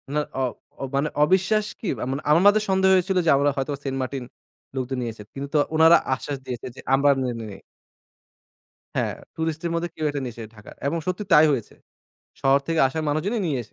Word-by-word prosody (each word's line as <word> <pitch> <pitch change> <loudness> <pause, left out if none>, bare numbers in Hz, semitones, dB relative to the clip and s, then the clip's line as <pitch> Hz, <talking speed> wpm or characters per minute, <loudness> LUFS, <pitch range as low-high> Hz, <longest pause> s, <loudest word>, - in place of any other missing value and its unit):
না - - +3 0.2
অ - - +1 0.4
অ - - -3
মানে 145 +2 +1
অবিশ্বাস 190 +5 +2
কি? 210 - -5 0.2
আ - - -1
মানে 140 +2 -3
আমাদের 205 +6 +5
সন্দেহ 190 0 +3
হয়েছিল 185 +1 +1
যে 160 - +3
আমরা 145 +1 +3
হয়তো 135 +2 -1
সেন্টমার্টিন 135 -1 -3 0.5
লোকদের 130 0 -2
নিয়েছে 115 -3 -5
কিন্তু 140 +1 -5
তো - - +5 0.2
উনারা 160 +1 +7 0.2
আশ্বাস 140 +2 -4
দিয়েছে 125 -2 -5
যে - - -12
আমরা 140 +1 +4
নেইনি। 115 -5 -4 1.4
হ্যাঁ, - - 0 0.2
টুরিস্টের 160 +1 -2
মধ্যে 170 +1 -1
কেউ 155 - -3
একটা 145 -1 -3
নিয়েছে 120 -2 -6
ঢাকার। 105 - -13
এবং 165 +3 0
সত্যি 185 +3 -2
তাই 155 +1 +8
হয়েছে। 125 -6 -3 0.7
শহর 135 +1 +4
থেকে 165 -1 0
আসা 160 +5 -4
মানুষজনই 190 +10 -1
নিয়ে 155 - 0
এসে। - - -2
145 Hz, 185 wpm, -24 LUFS, 130-170 Hz, 1.4 s, তাই